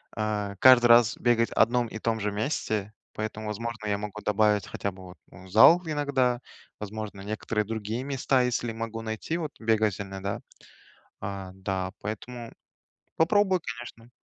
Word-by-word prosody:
э, 105 -2 -2
каждый 130 -2 +8
раз 120 0 +6
бегать 115 -1 +2
одном 120 0 +3
и 110 - -7
том 110 0 -1
же 105 0 -1
месте, 105 -2 -2 0.2
поэтому, 110 0 -5
возможно, 110 0 -4
я 100 -1 +1
могу 105 0 -6
добавить 105 -1 +2
хотя 100 - -3
бы 95 0 -13
вот, 90 0 -12
м, 95 +2 -13
зал 135 - +7
иногда, 140 -5 +1 0.4
возможно, 105 -1 -6
некоторые 105 +1 -2
другие 110 +2 -3
места, 135 -1 +1
если 120 -1 -1
могу 115 0 -5
найти, 110 +9 -3
вот 155 -4 -4
бегать 110 -3 +1
иногда. 95 0 -4 0.8
А, 100 -2 -5
да, 95 -1 -3
поэтому 115 +3 -6 0.6
попробую, 190 +2 +3
конечно. 115 0 -8
110 Hz, 150 wpm, -27 LUFS, 105-120 Hz, 0.8 s, каждый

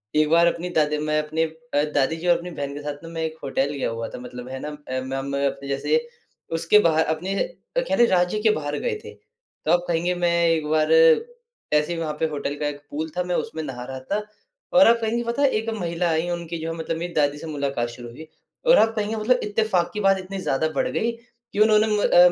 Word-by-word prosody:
एक 155 0 +3
बार 170 +1 +5
अपनी 175 +1 -1
दादी 150 0 +2
मैं 155 0 +1
अपने 155 +2 -1
अ, 160 -2 -2
दादी 145 +3 +2
जी 170 +2 -5
और 175 -1 +5
अपनी 175 +1 -7
बहन 140 -2 -4
के 145 - -6
साथ 145 +1 -6
ना 165 - -8
मैं 165 -1 -4
एक 160 0 -5
होटल 135 0 0
गया 140 - -2
हुआ 115 0 -4
था - - -8
मतलब 125 0 -8
है 130 0 -5
ना - - -4
म 135 -2 -4
मैं 140 0 0
अप 135 0 -4
जैसे 140 - +1 0.6
उसके 170 +6 +5
बाहर 160 -4 +3
अपने 190 +5 -4 0.4
कह - - +1
लें 240 - +6
राज्य 180 +3 +2
के 220 -1 +4
बाहर 145 -5 -2
गए 475 -3 -1
थे। - - -9 0.5
तब 175 +2 +3
कहेंगे 175 +1 +1
मैं 175 -1 +1 0.2
एक 160 -2 +1
बार 155 0 +2 0.8
ऐसे 150 +3 +2
ही - - -4
वहाँ 155 -2 -2
पे 160 - +2
होटल 145 -1 -3
का 150 - 0
एक 145 -1 -5
पूल 155 +2 -3
था 180 - +1
मैं 180 0 -2
उसमे 160 - -3
नहा 130 -4 -6
रहा 130 0 -6
था 210 +1 0 0.5
और 270 -1 +7
आप 235 0 +6
कहेंगे 235 +2 0
पता 235 +4 -2
है 280 - +5
एक 225 +1 -4
महिला 170 0 -1
आयी 160 +2 0
उनकी 170 -1 -4
जो 165 +1 -3
है 165 - -6
मतलब 160 0 -3
मेरी 175 +1 -5
दादी 145 -1 +2
से 160 - -8
मुलाकात 140 -5 -2
शुरू 120 0 -9
हुई 155 +7 -11 0.4
और - - +7
आप 225 0 +4
कहेंगे 215 +1 -1
मतलब 245 +4 +2
इत्तेफ़ाक 205 -4 +1
की 210 - -3
बात 195 0 +4
इतनी 190 +1 -6
ज़्यादा 160 -2 0
बढ़ - - +1
गयी 230 +2 0 0.4
कि 205 - -2
उन्होंने 215 0 +5
अ 210 -4 +2
165 Hz, 240 wpm, -23 LUFS, 145-190 Hz, 0.8 s, और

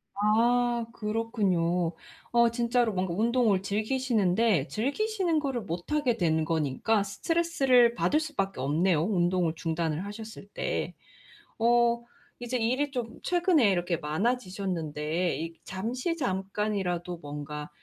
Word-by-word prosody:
아. 235 +3 +2
그렇군요. 190 -6 0 0.4
어 235 0 +5
진짜로 235 -2 +1
뭔가 185 -2 -1
운동을 225 -2 +2
즐기시는데 215 - +1
즐기시는 340 - 0
거를 270 -5 -2
못 175 - -6
하게 280 -6 +1
된 160 -3 +2
거니까 165 +7 +1
스트레스를 260 -1 +2
받을 300 - +2
수밖에 195 - -3
없네요, 155 +4 +2
운동을 175 -3 +1
중단을 165 +1 -2
하셨을 215 0 -8
때. - - -2 0.7
어 235 0 +3 0.4
이제 245 +1 -2
일이 255 +5 0
좀 240 -4 -5
최근에 345 - +3
이렇게 175 -1 0
많아지셨는데 175 - -1
이 165 +1 -4
잠시 245 - -3
잠깐이라도 190 - -2
뭔가 150 0 -7
210 Hz, 280 characters per minute, -28 LUFS, 175-240 Hz, 0.7 s, 어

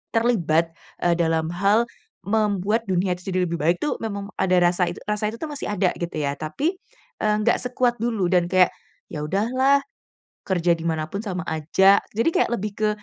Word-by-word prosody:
terlibat, 170 -9 +2 0.3
eee, 175 -1 +3
dalam 160 -2 +1
hal 200 +7 +2 0.4
membuat 210 0 +1
dunia 185 -1 +1
itu 180 +2 -8
jadi 185 0 +1
lebih 170 - -2
baik 165 +4 +3
itu 300 - 0
memang 200 -2 -4
ada 185 -1 +3
rasa 175 +1 +3
itu - - -9
rasa 210 0 0
itu 230 - -8
tuh 315 - -4
masih 290 - -5
ada 185 -2 +2
gitu 170 0 -4
ya 140 -1 -1
tapi, 285 - -2 0.4
eee, 210 0 +2
nggak 235 +3 +3
sekuat 250 -1 0
dulu 220 -6 0
dan 180 -2 +3
kayak, 185 -1 +5 0.4
ya 150 -1 -4
udahlah 255 - +2 0.7
kerja 175 -2 +2
di 165 - -7
mana 160 -1 0
pun 200 - -2
sama 190 -5 -4
aja, 180 +6 +4 0.2
jadi 230 +7 +2
kayak - - +2
lebih 210 -1 -4
ke 215 0 +2
195 Hz, 190 wpm, -23 LUFS, 175-220 Hz, 0.7 s, kayak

